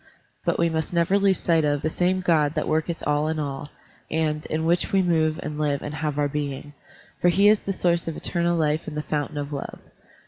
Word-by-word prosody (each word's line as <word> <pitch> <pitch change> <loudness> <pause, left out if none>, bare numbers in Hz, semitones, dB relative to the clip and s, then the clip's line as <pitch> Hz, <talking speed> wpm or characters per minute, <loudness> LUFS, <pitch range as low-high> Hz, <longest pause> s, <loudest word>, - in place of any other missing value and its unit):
But - - +1
we 170 - +3
must 160 0 -2
never 170 +4 +3
lose 195 -2 +3
sight 165 -2 +2
of 145 -1 0
"the 155 - +1
same 185 +2 +1
God 160 -4 +2
that 155 - -1
worketh 160 +2 -1
all 150 +1 +1
in 160 0 -1
all," 145 -1 -4 0.4
and 155 -1 -1
"in 160 +1 -1
which 175 +1 +1
we 195 -1 +3
move 160 -3 +1
and 150 0 -5
live 145 -2 0
and 145 - -5
have 150 -1 -2
our 145 -1 +2
being," 145 0 -4 0.5
for 175 - +5
he 195 +4 +4
is 210 0 +6
the 195 - -4
source 170 -3 0
of 165 - -3
eternal 170 -1 0
life 155 0 0
and 150 -1 -5
the 150 - -2
fountain 150 -1 -3
of 145 0 -4
love. 140 - -5
155 Hz, 230 wpm, -24 LUFS, 150-170 Hz, 0.5 s, is